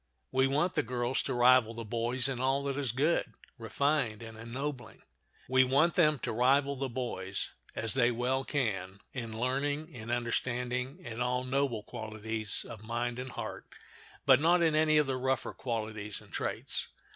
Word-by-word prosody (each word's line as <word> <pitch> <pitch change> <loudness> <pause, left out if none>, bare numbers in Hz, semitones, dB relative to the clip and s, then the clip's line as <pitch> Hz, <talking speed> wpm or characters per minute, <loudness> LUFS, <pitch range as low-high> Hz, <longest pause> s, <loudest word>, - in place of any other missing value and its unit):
We 130 0 +3
want 150 +7 +1
the 150 - +2
girls 125 -1 0
to 135 - -2
rival 120 -2 +5
the 115 0 -5
boys 120 +4 0
in 130 -2 -2
all 135 +2 +1
that 140 -1 -1
is 135 -4 -1
good, 145 +8 +1 0.3
refined, 120 -1 0
and 115 -1 -8
ennobling. 125 +4 -6 0.4
We 130 +1 +5
want 140 +7 +3
them 155 -4 +4
to - - -1
rival 135 +4 +3
the 135 0 -3
boys, 100 -6 -2 0.2
as 115 -1 +1
they 120 -2 +4
well 125 +3 0
can, 100 -9 -2
in 115 -3 -5
learning, 145 +5 0
in 115 -2 -7
understanding, 125 +3 -1
in 120 0 -5
all 125 +1 +1
noble 130 -4 0
qualities 110 -2 -4
of 115 -3 -9
mind 120 +2 -2
and 130 +1 -4
heart, - - -6 0.6
but 135 -1 +7
not 170 +2 +4
in 160 -2 +3
any 155 0 +4
of 150 - +5
the 135 -1 -1
rougher 130 0 -1
qualities 110 -4 -4
and - - -18
traits. - - -3
125 Hz, 170 wpm, -31 LUFS, 115-135 Hz, 0.6 s, but